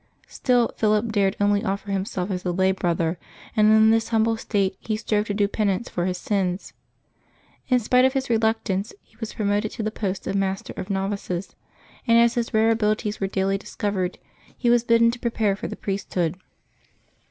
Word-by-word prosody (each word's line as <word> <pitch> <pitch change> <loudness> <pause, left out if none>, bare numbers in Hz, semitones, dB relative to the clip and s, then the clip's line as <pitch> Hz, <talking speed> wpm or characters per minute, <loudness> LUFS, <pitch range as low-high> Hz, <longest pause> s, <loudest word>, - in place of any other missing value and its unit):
Still 245 -2 +1
Philip 215 +1 +2
dared 200 -2 +2
only 205 0 +2
offer 200 +1 -3
himself 195 -1 -2
as 180 -1 -3
a 180 - -1
lay 190 +2 +2
brother, 170 -2 -1 0.4
and 215 -1 +5
in 220 0 +6
this 225 0 +2
humble 225 0 +2
state 200 -3 -1
he 215 - -2
strove^ 215 -1 0
to 205 - -1
do 205 -1 +2
penance 205 +1 -1
for 175 0 -2
his 180 -1 -2
sins. 185 -1 -2 0.9
In 255 - +4
spite 250 +3 +3
of 260 0 +3
his 270 -1 -1
reluctance, 220 -3 0
he - - -30
was 225 - -6
promoted 210 0 0
to 225 - -4
the 215 - -1
post 195 -3 -3
of - - -2
master 195 +2 -2
of 185 - -6
novices; 195 -2 -3 0.5
and 230 0 +5
as 235 0 +5
his 235 -1 -2
rare 220 +1 +3
abilities 215 -1 0
were 195 - 0
daily 195 0 0
discovered, 195 -3 -3 0.4
he 240 - +2
was 240 -1 +4
bidden 230 0 +4
to 240 - -8
prepare 225 -4 0
for - - -5
the - - -6
priesthood. 190 -4 -2
210 Hz, 185 wpm, -24 LUFS, 195-225 Hz, 0.9 s, in